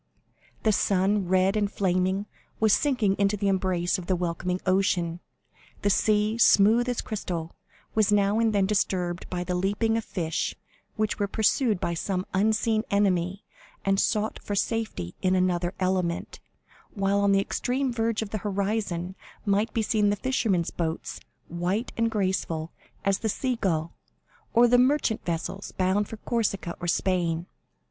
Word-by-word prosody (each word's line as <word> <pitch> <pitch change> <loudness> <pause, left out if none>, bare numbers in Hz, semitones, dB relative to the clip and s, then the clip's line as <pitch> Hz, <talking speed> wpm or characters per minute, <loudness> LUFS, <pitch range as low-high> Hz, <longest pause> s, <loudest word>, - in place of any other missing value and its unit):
The 220 - +4
sun, 195 -1 +1
red 185 +2 +3
and 205 -1 0
flaming, 190 +1 0 0.3
was 220 -1 +4
sinking 245 -9 +2
into 200 +1 +2
the 200 0 -1
embrace 185 -1 +1
of 175 - -9
the 185 - +2
welcoming 180 +1 -2
ocean. 180 -3 +1 0.6
The 205 - +3
sea, 215 +2 +2
smooth 230 +3 +5
as 245 - -1
crystal, 175 -7 -4 0.4
was 215 -2 +3
now 205 +1 +3
and 225 -1 +3
then 200 -2 +2
disturbed 185 -3 -1
by 180 -1 -2
the 180 - -3
leaping 205 +5 +1
of 225 - -2
fish, 165 -6 -2 0.4
which 215 -3 -1
were 205 - +1
pursued 220 0 +1
by 170 - -1
some 185 +2 -2
unseen 215 +2 +2
enemy 195 -1 +1 0.4
and 195 0 +2
sought 215 +1 0
for 205 - -3
safety 205 - -2
in 185 0 +2
another 180 -1 0
element; 185 -2 -1 0.6
while 195 0 +1
on 200 0 +3
the 195 - +4
extreme 250 +6 -1
verge 225 -1 0
of 205 - -9
the 215 - -2
horizon 195 -3 -2 0.3
might 205 +3 +1
be 225 - 0
seen 210 -2 +2
the 205 - +2
fishermen's 205 -6 0
boats, 165 -1 -3 0.3
white 180 +7 -2
and 230 0 +1
graceful 185 -6 -1 0.3
as 195 -1 +2
the 220 - -1
sea 255 +4 -1
gull, 170 -7 -1 0.6
or 240 +1 +7
the 245 +1 +5
merchant 255 -3 +2
vessels 175 +3 -4
bound 190 +2 +1
for 225 - -8
Corsica 210 -6 -2
or 175 - -4
Spain. 170 -2 0
195 Hz, 155 wpm, -26 LUFS, 180-215 Hz, 0.6 s, or